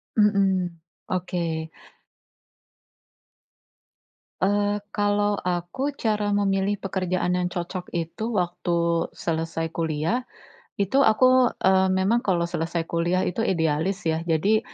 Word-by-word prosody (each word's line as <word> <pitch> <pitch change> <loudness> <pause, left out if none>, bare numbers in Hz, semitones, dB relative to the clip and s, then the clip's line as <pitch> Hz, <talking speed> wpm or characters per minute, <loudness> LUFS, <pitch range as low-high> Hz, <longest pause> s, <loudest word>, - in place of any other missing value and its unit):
Mhm. 190 -5 +2 0.3
Oke. 170 -3 -2 2.7
Eee, 205 +1 +1
kalau 205 0 +1
aku 180 +11 -2
cara 210 -3 0
memilih 195 0 +1
pekerjaan 185 -2 -1
yang 180 - 0
cocok 180 +1 -5
itu 210 +7 -3
waktu 170 -2 0
selesai 165 0 -2
kuliah, 165 +10 -1 0.5
itu 200 +8 +1
aku, 255 +1 +5
eee, 190 0 +3
memang 190 +5 +2
kalau 180 -6 0
selesai 170 -1 -2
kuliah 170 +2 0
itu 180 - -2
idealis 170 +2 0
ya. 160 -1 0
Jadi, 195 +7 +3
185 Hz, 100 wpm, -25 LUFS, 170-205 Hz, 2.7 s, aku